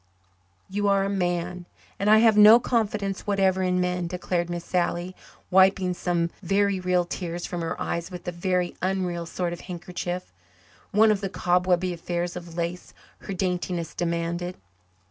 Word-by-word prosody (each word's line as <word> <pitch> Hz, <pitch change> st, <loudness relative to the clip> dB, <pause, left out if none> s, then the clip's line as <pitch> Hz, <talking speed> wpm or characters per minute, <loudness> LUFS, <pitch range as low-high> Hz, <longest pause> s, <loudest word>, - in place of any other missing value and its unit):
"You 205 Hz, +1 st, -1 dB
are 200 Hz, -1 st, +3 dB
a 200 Hz, -, -1 dB
man 180 Hz, -1 st, -2 dB, 0.3 s
and 200 Hz, -, +1 dB
I 215 Hz, -, +8 dB
have 220 Hz, -1 st, +5 dB
no 210 Hz, +2 st, +9 dB
confidence 210 Hz, -5 st, -1 dB
whatever 190 Hz, -2 st, +2 dB
in 180 Hz, 0 st, +1 dB
men," 180 Hz, -1 st, -1 dB
declared 175 Hz, -1 st, -2 dB
Miss 175 Hz, -1 st, -4 dB
Sally, 180 Hz, 0 st, -1 dB, 0.4 s
wiping 190 Hz, 0 st, +4 dB
some 170 Hz, -1 st, -1 dB
very 200 Hz, +1 st, +1 dB
real 180 Hz, -1 st, +1 dB
tears 175 Hz, -1 st, -4 dB
from 175 Hz, -, -4 dB
her 165 Hz, -, -3 dB
eyes 170 Hz, +1 st, -3 dB
with 180 Hz, -2 st, -9 dB
a -, -, 0 dB
very 180 Hz, 0 st, -1 dB
unreal 180 Hz, -3 st, -1 dB
sort 175 Hz, +1 st, -2 dB
of 175 Hz, -, -8 dB
handkerchief 180 Hz, -, -5 dB, 0.6 s
one 215 Hz, +2 st, +5 dB
of 205 Hz, -, 0 dB
the 195 Hz, -, -2 dB
cobwebby 180 Hz, 0 st, +1 dB
affairs 175 Hz, +1 st, -3 dB
of 170 Hz, -2 st, -8 dB
lace 170 Hz, +1 st, -4 dB, 0.2 s
her 195 Hz, -, -6 dB
daintiness 180 Hz, -2 st, -2 dB
demanded. 170 Hz, +1 st, -2 dB
180 Hz, 160 wpm, -25 LUFS, 175-195 Hz, 0.6 s, no